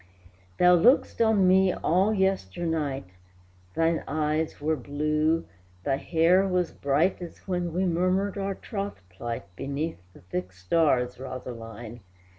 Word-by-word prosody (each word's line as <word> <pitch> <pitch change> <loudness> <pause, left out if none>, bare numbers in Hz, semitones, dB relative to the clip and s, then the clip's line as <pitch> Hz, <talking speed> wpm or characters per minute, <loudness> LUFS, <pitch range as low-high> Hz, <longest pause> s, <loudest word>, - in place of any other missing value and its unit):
Thou 180 0 +6
look'dst 240 +7 +3
on 215 -4 +4
me 190 0 +4
all 185 +6 +2
yesternight, 165 - -1 0.7
Thine 165 0 +1
eyes 155 +1 -1
were 155 +2 0
blue, 150 +4 0 0.4
thy 135 +5 +1
hair 175 +6 +3
was 180 -2 0
bright 150 +7 +1
As 175 +2 -10
when 175 -2 -1
we 185 +3 0
murmured 185 +3 +1
our 195 -1 -2
troth 200 - -6
plight 115 +4 -5
Beneath 140 - -3
the - - -16
thick 90 +1 -5
stars, 125 - +1
Rosaline! 120 -3 -8
160 Hz, 125 wpm, -27 LUFS, 135-185 Hz, 0.7 s, Thou